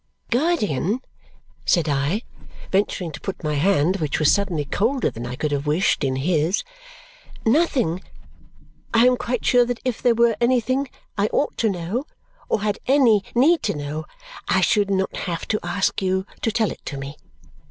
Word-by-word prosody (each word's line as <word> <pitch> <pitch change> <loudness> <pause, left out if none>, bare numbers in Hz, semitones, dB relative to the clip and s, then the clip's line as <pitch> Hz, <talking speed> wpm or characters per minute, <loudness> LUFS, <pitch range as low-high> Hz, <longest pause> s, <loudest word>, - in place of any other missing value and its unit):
"Guardian," 235 - +1 0.6
said 170 -3 +2
I, 145 - 0 0.5
venturing 190 -3 0
to - - -9
put 195 -2 -5
my 150 -1 -1
hand, 175 +3 +2
which 155 -5 -1
was 155 -1 +4
suddenly 180 -7 0
colder 235 - 0
than 120 +2 -6
I 125 - -5
could 150 +2 -2
have 145 0 -2
wished, 155 +6 +2
in 130 -1 0
his, 160 +5 +1 0.8
"nothing! 240 - +2 0.9
I 230 +1 +6
am 250 0 +5
quite 245 -1 -3
sure 245 -1 +5
that 240 -1 -3
if 250 -3 -2
there 240 -2 +3
were 235 -1 +3
anything 255 +2 +1 0.3
I 205 - +3
ought 290 - 0
to 225 - +3
know 195 - -3 0.4
or 205 - 0
had 210 -1 -1
any 245 -7 +4
need 310 +8 +4
to 205 - -1
know, 150 +2 -4 0.4
I - - +3
should 205 -3 +2
not 190 -1 0
have 170 -3 -4
to 215 - +1
ask 200 0 -1
you 190 0 0 0.2
to 225 - +1
tell 220 -1 +1
it - - -10
to 140 - -5
me. 140 +2 -6
200 Hz, 175 wpm, -22 LUFS, 155-235 Hz, 0.9 s, I